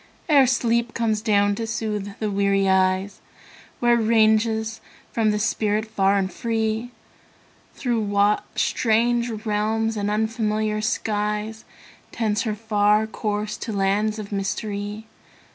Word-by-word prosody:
Ere 280 Hz, -5 st, +5 dB
sleep 235 Hz, -1 st, +1 dB
comes 220 Hz, -2 st, 0 dB
down 205 Hz, -2 st, +2 dB
to 225 Hz, +2 st, -4 dB
soothe 210 Hz, -2 st, -3 dB
the 215 Hz, -2 st, -2 dB
weary 195 Hz, 0 st, +2 dB
eyes, 190 Hz, +1 st, +1 dB, 0.6 s
Where 240 Hz, 0 st, +4 dB
ranges 220 Hz, 0 st, +2 dB, 0.3 s
forth 225 Hz, -2 st, +2 dB
the 210 Hz, -, +1 dB
spirit 215 Hz, -1 st, 0 dB
far 200 Hz, -2 st, +1 dB
and 190 Hz, -2 st, -1 dB
free? 225 Hz, 0 st, -1 dB, 0.9 s
Through 240 Hz, -4 st, -1 dB
what 205 Hz, 0 st, +2 dB
strange 235 Hz, +1 st, +1 dB, 0.2 s
realms 220 Hz, +1 st, 0 dB
and 205 Hz, -1 st, -1 dB
unfamiliar 215 Hz, 0 st, -1 dB
skies. 215 Hz, -1 st, -2 dB, 0.5 s
Tends 215 Hz, -2 st, 0 dB
her 210 Hz, -, -2 dB
far 210 Hz, 0 st, +2 dB
course 210 Hz, -1 st, -3 dB
to 230 Hz, -, -5 dB
lands 205 Hz, +2 st, 0 dB
of 210 Hz, -1 st, -7 dB
mystery? 205 Hz, +1 st, -3 dB
215 Hz, 125 wpm, -23 LUFS, 205-225 Hz, 0.9 s, Ere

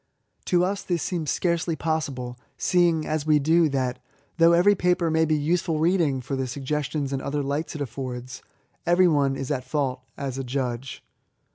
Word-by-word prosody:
To 180 Hz, 0 st, +3 dB
us 195 Hz, +1 st, -2 dB
this 175 Hz, -3 st, -2 dB
seems 165 Hz, -5 st, -2 dB
scarcely 170 Hz, -1 st, 0 dB
possible, 135 Hz, -7 st, -3 dB, 0.2 s
seeing, 170 Hz, -3 st, +2 dB
as 155 Hz, -1 st, -2 dB
we 155 Hz, -1 st, +5 dB
do, 160 Hz, +3 st, +3 dB
that, 130 Hz, -3 st, -1 dB, 0.4 s
though 165 Hz, 0 st, +7 dB
every 180 Hz, +4 st, +5 dB
paper 180 Hz, -3 st, +1 dB
may 160 Hz, 0 st, +3 dB
be 155 Hz, 0 st, +2 dB
useful 160 Hz, +2 st, 0 dB
reading 160 Hz, -5 st, +2 dB
for 135 Hz, +2 st, -4 dB
the 130 Hz, 0 st, -1 dB
sugges 140 Hz, +3 st, -2 dB
tions 140 Hz, -2 st, -3 dB
and 135 Hz, -, -2 dB
other 145 Hz, +1 st, -2 dB
lights 145 Hz, +4 st, -3 dB
it 150 Hz, -, -5 dB
affords, 130 Hz, -1 st, -5 dB, 0.4 s
every 175 Hz, +1 st, +4 dB
one 140 Hz, -4 st, +2 dB
is 135 Hz, +1 st, -4 dB
at 130 Hz, -3 st, -1 dB
fault, 130 Hz, -1 st, -2 dB, 0.2 s
as 135 Hz, -1 st, -4 dB
a -, -, -2 dB
judge. 125 Hz, -1 st, -4 dB
150 Hz, 180 wpm, -25 LUFS, 135-165 Hz, 0.4 s, though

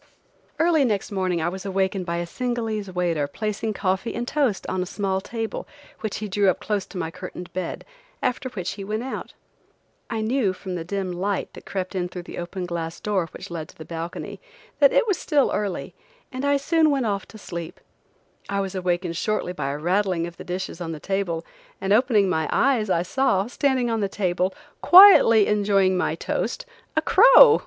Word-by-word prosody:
Early 325 Hz, -2 st, +3 dB
next 215 Hz, -6 st, -1 dB
morning 185 Hz, -4 st, 0 dB
I 170 Hz, -, +1 dB
was 190 Hz, +1 st, -7 dB
awakened 190 Hz, -1 st, -1 dB
by 170 Hz, -, -1 dB
a 175 Hz, -, -2 dB
Singalese 225 Hz, -1 st, -3 dB
waiter 170 Hz, -5 st, 0 dB
placing 215 Hz, +6 st, -3 dB
coffee 190 Hz, +2 st, -1 dB
and 240 Hz, +1 st, -3 dB
toast 265 Hz, -10 st, 0 dB
on 185 Hz, -, -2 dB
a -, -, -1 dB
small 190 Hz, -1 st, -1 dB
table 225 Hz, +2 st, -5 dB, 0.3 s
which 220 Hz, -3 st, -3 dB
he 215 Hz, -, -4 dB
drew 200 Hz, 0 st, +2 dB
up 185 Hz, -, 0 dB
close 205 Hz, -1 st, -2 dB
to -, -, -9 dB
my 165 Hz, -2 st, -3 dB
curtained 180 Hz, 0 st, -8 dB
bed, 185 Hz, -2 st, -4 dB, 0.3 s
after 255 Hz, +1 st, -1 dB
which 185 Hz, -7 st, -4 dB
he 200 Hz, -, -7 dB
went 215 Hz, +3 st, -3 dB
out. 265 Hz, -, -6 dB, 0.7 s
I 225 Hz, -2 st, -2 dB
knew 220 Hz, -3 st, +1 dB
from 185 Hz, 0 st, -7 dB
the 175 Hz, -2 st, -3 dB
dim 190 Hz, +1 st, -3 dB
light 190 Hz, +3 st, -2 dB
that -, -, -12 dB
crept 185 Hz, -1 st, -3 dB
in 180 Hz, -2 st, -2 dB
through 180 Hz, -1 st, -7 dB
the -, -, -8 dB
open 180 Hz, +1 st, -4 dB
glass 170 Hz, -1 st, -4 dB
door 190 Hz, -6 st, -1 dB
which -, -, -10 dB
led 160 Hz, -2 st, -5 dB
to -, -, -17 dB
the 160 Hz, -, -9 dB
balcony, 165 Hz, 0 st, -6 dB, 0.4 s
that 280 Hz, -2 st, +6 dB
it -, -, +3 dB
was 400 Hz, -5 st, 0 dB
still 290 Hz, -4 st, +2 dB
early, 200 Hz, -3 st, -3 dB, 0.4 s
and 260 Hz, +1 st, -4 dB
I 285 Hz, 0 st, +3 dB
soon 315 Hz, +3 st, +3 dB
went 275 Hz, -4 st, +1 dB
off 200 Hz, -3 st, -2 dB
to 220 Hz, -, -12 dB
sleep. 170 Hz, -5 st, -7 dB, 0.7 s
I 200 Hz, 0 st, 0 dB
was 195 Hz, -1 st, -2 dB
awakened 180 Hz, -2 st, -1 dB
shortly 215 Hz, -4 st, -1 dB
by 150 Hz, -5 st, -3 dB
a 140 Hz, -, -3 dB
rattling 180 Hz, +1 st, +1 dB
of 170 Hz, 0 st, -8 dB
the -, -, -9 dB
dishes 180 Hz, -1 st, -5 dB
on 165 Hz, -1 st, -3 dB
the 155 Hz, -, -7 dB
table, 175 Hz, -3 st, -2 dB, 0.3 s
and 195 Hz, +1 st, +1 dB
opening 215 Hz, -3 st, +4 dB
my 160 Hz, -4 st, 0 dB
eyes 240 Hz, -7 st, +2 dB
I 170 Hz, -2 st, +2 dB
saw, 195 Hz, -2 st, +1 dB
standing 250 Hz, 0 st, 0 dB
on 225 Hz, -, 0 dB
the 200 Hz, -2 st, 0 dB
table, 185 Hz, -1 st, 0 dB, 0.3 s
quietly 350 Hz, -, +9 dB
enjoying 200 Hz, -2 st, +2 dB
my 180 Hz, -, 0 dB
toast, -, -, -3 dB, 0.3 s
a 315 Hz, -, +2 dB
crow! 480 Hz, +1 st, +8 dB
195 Hz, 200 wpm, -24 LUFS, 180-225 Hz, 0.7 s, quietly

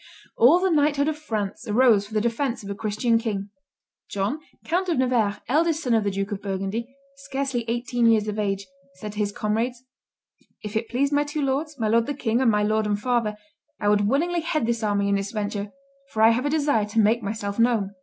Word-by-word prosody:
All 255 Hz, +9 st, +6 dB
the 375 Hz, 0 st, +1 dB
knighthood 290 Hz, -2 st, +2 dB
of 310 Hz, -1 st, -2 dB
France 220 Hz, -5 st, -4 dB
arose 215 Hz, -2 st, +4 dB
for 220 Hz, -, -10 dB
the 215 Hz, -, +2 dB
defence 235 Hz, +1 st, -1 dB
of 200 Hz, -, -6 dB
a -, -, -1 dB
Christian 220 Hz, +3 st, 0 dB
king. 205 Hz, -3 st, -3 dB, 0.6 s
John, 205 Hz, +9 st, -2 dB, 0.3 s
Count 360 Hz, +3 st, 0 dB
of 335 Hz, -, +1 dB
Nevers, 240 Hz, -5 st, +2 dB
eldest 315 Hz, +5 st, +1 dB
son 245 Hz, -, +1 dB
of 220 Hz, -2 st, +3 dB
the 205 Hz, -, 0 dB
Duke 195 Hz, +1 st, -3 dB
of 200 Hz, -1 st, -4 dB
Burgundy, 195 Hz, +4 st, -3 dB, 0.3 s
scarcely 270 Hz, -3 st, -3 dB
eighteen 240 Hz, 0 st, 0 dB
years 220 Hz, -2 st, +3 dB
of 210 Hz, 0 st, -3 dB
age, 200 Hz, -1 st, -1 dB, 0.3 s
said 210 Hz, +3 st, -7 dB
to 210 Hz, -, -8 dB
his 205 Hz, -1 st, 0 dB
comrades, 230 Hz, +4 st, -2 dB, 0.8 s
"If 210 Hz, 0 st, -6 dB
it 220 Hz, +1 st, -1 dB
pleased 275 Hz, +4 st, 0 dB
my 290 Hz, +1 st, +3 dB
two 295 Hz, 0 st, -3 dB
lords, 285 Hz, +3 st, -1 dB
my 225 Hz, -3 st, 0 dB
lord 230 Hz, +1 st, +2 dB
the 290 Hz, -, -2 dB
king 235 Hz, -2 st, 0 dB
and 255 Hz, -, +4 dB
my 210 Hz, -1 st, +2 dB
lord 215 Hz, 0 st, +1 dB
and 205 Hz, -1 st, 0 dB
father, 230 Hz, -2 st, 0 dB, 0.4 s
I 205 Hz, -, +1 dB
would 205 Hz, -1 st, +3 dB
willingly 335 Hz, +8 st, +1 dB
head 310 Hz, -5 st, -1 dB
this 235 Hz, 0 st, -1 dB
army 205 Hz, -2 st, +1 dB
and 200 Hz, 0 st, +2 dB
this 200 Hz, +1 st, -4 dB
venture, 205 Hz, -1 st, -3 dB, 0.4 s
for 220 Hz, -3 st, 0 dB
I 225 Hz, -, +8 dB
have 250 Hz, +5 st, 0 dB
a -, -, 0 dB
desire 290 Hz, -8 st, +2 dB
to 210 Hz, +2 st, -1 dB
make 220 Hz, +3 st, +3 dB
myself 205 Hz, 0 st, -4 dB
known." 225 Hz, -4 st, +2 dB
225 Hz, 220 wpm, -24 LUFS, 205-270 Hz, 0.8 s, I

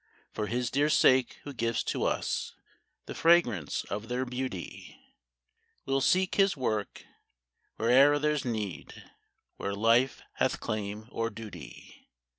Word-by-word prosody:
For 105 Hz, -1 st, -3 dB
His 120 Hz, +2 st, -2 dB
dear 145 Hz, +2 st, +2 dB
sake 130 Hz, -4 st, +4 dB
who 145 Hz, -, -7 dB
gives 115 Hz, -2 st, -1 dB
to -, -, -2 dB
us -, -, -2 dB, 0.5 s
The -, -, -7 dB
fragrance 125 Hz, -, +2 dB
of 105 Hz, +2 st, -5 dB
their 125 Hz, +2 st, -2 dB
beauty, 125 Hz, -7 st, -6 dB, 0.9 s
We -, -, -5 dB
'11 135 Hz, 0 st, +2 dB
seek 185 Hz, +6 st, +2 dB
His 195 Hz, -4 st, +2 dB
work 110 Hz, -5 st, -3 dB, 0.7 s
where'er 135 Hz, +6 st, +5 dB
there 150 Hz, +1 st, +1 dB
's 145 Hz, -, -2 dB
need, 105 Hz, -, -5 dB, 0.5 s
Where 100 Hz, -, -3 dB
life 115 Hz, +5 st, +2 dB
hath -, -, +1 dB
claim 105 Hz, 0 st, -4 dB
or 115 Hz, 0 st, -2 dB
duty. 105 Hz, -9 st, -11 dB
120 Hz, 135 wpm, -29 LUFS, 105-135 Hz, 0.9 s, where'er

